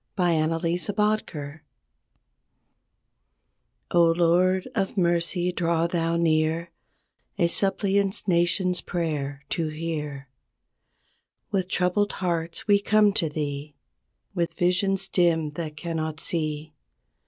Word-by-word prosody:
A - - 0
KANSAS 165 +2 +1
PRAYER 160 -9 -2 2.3
0, 175 -1 +6
Lord 180 +2 +2
of 195 -2 -2
mercy, 175 0 +1
draw 170 -2 0
Thou 170 -1 0
near, 165 +1 +1 0.7
A 170 - +3
suppliant 195 +2 +1
nation's 180 +1 +2
prayer 145 -5 -3
to 165 -4 -1
hear. 155 -3 -5 1.2
With 190 -3 0
troubled 185 +3 +1
hearts 170 -2 -2
we 200 -1 +4
come 210 -1 +4
to 165 -5 0
Thee 145 -1 -4 0.6
With 170 -2 -2
visions 195 +2 +1
dim 165 -5 +2
that 155 -1 -6
cannot 160 -1 -3
see. 155 -2 -2
170 Hz, 100 wpm, -25 LUFS, 155-185 Hz, 2.3 s, 0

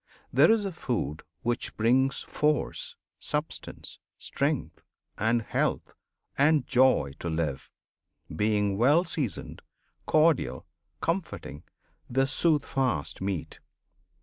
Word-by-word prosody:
there - - +6
is 220 -2 +3
a 195 - -2
food 115 - -3 0.2
which 120 +1 -2
brings 130 +5 +2
Force, 475 - -1 0.2
substance, 150 +1 -5 0.2
strength, - - -2 0.3
and 115 +2 +1
health, - - -1 0.5
and 145 -1 +4
joy 130 - +3
to 85 - -3
live, 80 -4 -2 0.7
Being 105 +1 +1
well 145 +8 +5
seasoned, 145 - -4 0.5
cordial, 155 -1 +2 0.4
comforting, 165 - -3 0.5
The 135 +2 +2
"Soothfast" 135 - 0
meat. 95 -4 -3
130 Hz, 95 wpm, -28 LUFS, 105-155 Hz, 0.7 s, there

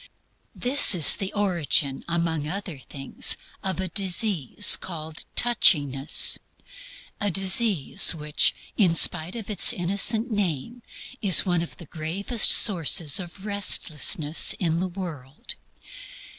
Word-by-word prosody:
This 255 -4 +4
is 165 -4 +6
the 195 -2 -5
origin, 170 -9 -1
among 165 -3 -3
other 180 -3 -6
things, 135 +1 0 0.2
of 190 -1 -4
a 190 - -3
disease 190 - +1
called 160 -3 -7
"touchiness" 145 - +2 0.8
a 205 - -1
disease 190 - +2
which, 150 -1 -1 0.2
in 180 -6 +1
spite 165 +3 +2
of 225 -4 -8
its 210 - +1
innocent 200 +6 -1
name, 205 - -4 0.4
is 195 -5 +4
one 175 -3 -1
of 170 - -9
the 170 - -13
gravest 175 - -1
sources 165 -5 +3
of 185 +2 -12
restlessness 165 -6 0
in 165 -3 -3
the 185 - -3
world. 155 -7 -8
175 Hz, 115 wpm, -23 LUFS, 155-200 Hz, 0.8 s, is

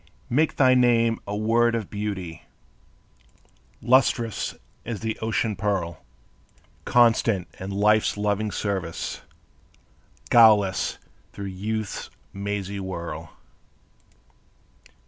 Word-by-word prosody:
Make 150 +6 +2
thy 130 -2 +5
name 115 -2 +3
a 100 - -3
word 115 +2 +2
of 110 -4 -4
beauty 100 -5 -5 1.4
Lustrous 120 -2 +2 0.3
as 115 -3 -5
the 110 -1 -2
ocean 110 -1 -1
pearl; 95 -5 -2 0.8
Constant 115 -5 +3
in 95 - -6
life's 105 +2 +2
loving 105 +1 0
service, 95 -5 -3 1.1
Guileless 105 -5 +5 0.4
through 100 - -6
youth's 110 +2 -4 0.2
mazy 100 0 -4
whirl. 90 -3 -6
105 Hz, 90 wpm, -24 LUFS, 100-115 Hz, 1.4 s, thy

